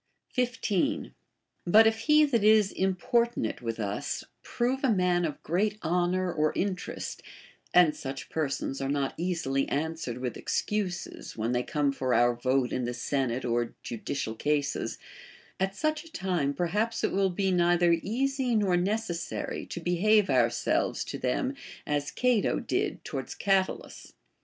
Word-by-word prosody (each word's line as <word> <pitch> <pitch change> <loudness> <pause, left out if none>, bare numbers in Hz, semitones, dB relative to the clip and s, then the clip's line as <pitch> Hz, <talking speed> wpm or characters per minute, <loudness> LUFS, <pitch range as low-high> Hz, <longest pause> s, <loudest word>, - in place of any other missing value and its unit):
15. 245 0 0 0.5
But 220 +5 +7
if 220 0 +3
he 300 +5 +5
that 235 -7 +1
is 215 -2 +5
importunate 190 - 0
with 115 -1 -4
us 105 -1 -3 0.2
prove 255 +3 -1
a 270 - +3
man 180 -4 +2
of 150 -3 -5
great 205 +6 0
honor 180 +2 +1
or 155 0 +2
interest 190 -1 -3 0.5
(and 175 -4 +5
such 135 0 -6
persons 140 -3 -2
are 135 - -1
not 140 -1 0
easily 160 -6 -1
answered 155 -4 -2
with 125 -2 -4
excuses, 195 - -3
when 115 +2 -1
they 125 0 +1
come 145 +2 0
for 130 -3 0
our 120 +1 +4
vote 130 +1 0
in 125 - -1
the 120 0 -3
senate 130 -3 -1
or 120 -1 -1
judicial 115 0 -4
cases), 145 +4 -1 0.6
at 190 +1 0
such 310 +2 -1
a 330 - -15
time 175 - -1
perhaps 210 +8 -1
it - - +2
will 195 0 +2
be 190 +1 0
neither 175 -1 +4
easy 260 +2 0
nor 200 -4 +3
necessary 180 -2 -2
to - - -5
behave 190 +5 +3
ourselves - - +1
to - - -6
them 265 -1 0 0.3
as 145 0 -1
C'ato 250 -1 +2
did - - -1
towards - - -5
Catulus. 195 -2 -1
175 Hz, 145 wpm, -28 LUFS, 140-215 Hz, 0.6 s, But